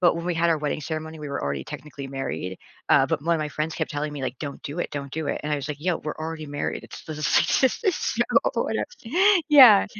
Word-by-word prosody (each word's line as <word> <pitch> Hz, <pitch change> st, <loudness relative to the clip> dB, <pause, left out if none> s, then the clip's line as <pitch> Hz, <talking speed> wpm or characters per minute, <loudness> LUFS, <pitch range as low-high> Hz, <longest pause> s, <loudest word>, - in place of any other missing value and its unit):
but 175 Hz, -2 st, +5 dB
when 170 Hz, -, -4 dB
we 180 Hz, -, 0 dB
had 170 Hz, +1 st, +2 dB
our 165 Hz, -, +3 dB
wedding 150 Hz, 0 st, -2 dB
ceremony, 160 Hz, +1 st, -5 dB
we 150 Hz, -1 st, -6 dB
were 140 Hz, -, -3 dB
already 70 Hz, -1 st, -2 dB
technically 140 Hz, -1 st, -8 dB
married. 95 Hz, -, -4 dB, 0.3 s
Uh, 135 Hz, -, +6 dB
but 160 Hz, -2 st, -1 dB
one 170 Hz, +2 st, +2 dB
of -, -, -3 dB
my 150 Hz, -, -2 dB
friends 155 Hz, +2 st, -2 dB
kept -, -, -2 dB
telling 150 Hz, 0 st, -2 dB
me 145 Hz, -2 st, -6 dB
like, 130 Hz, -1 st, -3 dB
"Don't 140 Hz, -2 st, -6 dB
do 145 Hz, +5 st, -6 dB
it. -, -, -2 dB
Don't 140 Hz, -1 st, -5 dB
do 160 Hz, 0 st, -3 dB
it." -, -, -2 dB
And 150 Hz, -, -2 dB
I -, -, +2 dB
was 140 Hz, 0 st, -5 dB
like, 150 Hz, -, -3 dB
"Yo, 175 Hz, +1 st, +1 dB
we're 150 Hz, -, -5 dB
already 160 Hz, -1 st, -5 dB
married." 145 Hz, 0 st, -3 dB
It's -, -, -11 dB
this 155 Hz, -1 st, -6 dB
is 155 Hz, -, -3 dB, 0.4 s
just 265 Hz, -, +2 dB
this -, -, -16 dB
is 380 Hz, -5 st, +3 dB
so -, -, 0 dB, 0.3 s
whatev -, -, 0 dB, 0.7 s
Yeah. 255 Hz, -9 st, +9 dB
150 Hz, 270 wpm, -25 LUFS, 140-165 Hz, 0.7 s, Yeah